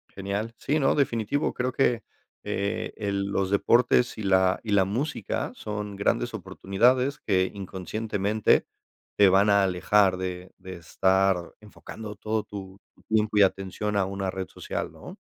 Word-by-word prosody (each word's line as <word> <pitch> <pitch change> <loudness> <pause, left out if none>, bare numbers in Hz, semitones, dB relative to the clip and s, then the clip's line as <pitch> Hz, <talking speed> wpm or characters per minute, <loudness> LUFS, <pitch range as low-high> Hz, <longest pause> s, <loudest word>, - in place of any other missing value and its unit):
Genial. 100 +4 -3
Sí, 150 +3 0
no. 135 -3 +3
Definitivo. 135 0 0
Creo 125 +1 -1
que, 120 -3 +1 0.4
eh, 100 +1 -2
el 100 -2 -2
los 95 -1 -1
deportes 120 +4 +3
y - - -4
la 95 -1 +3
y 110 - -4
la 100 -2 +5
música 115 +3 -3
son 105 -1 -5
grandes 100 - 0
oportunidades 125 +8 +1
que 95 -3 +1
inconscientemente 100 +2 0 0.5
te 100 - +6
van 95 +2 +4
a 100 -1 +5
alejar 95 +1 +3
de 90 0 -5
de 95 -1 -9
estar 95 +1 +1
enfocando 105 0 -9
todo 110 +1 -2
tu 95 -2 -9 0.2
tu - - -25
tiempo 110 -1 +1
y - - +7
atención 95 +2 0
a 100 - +3
una 95 0 -3
red 95 0 -5
social, - - -5
¿no? - - -11
100 Hz, 155 wpm, -26 LUFS, 95-110 Hz, 0.5 s, y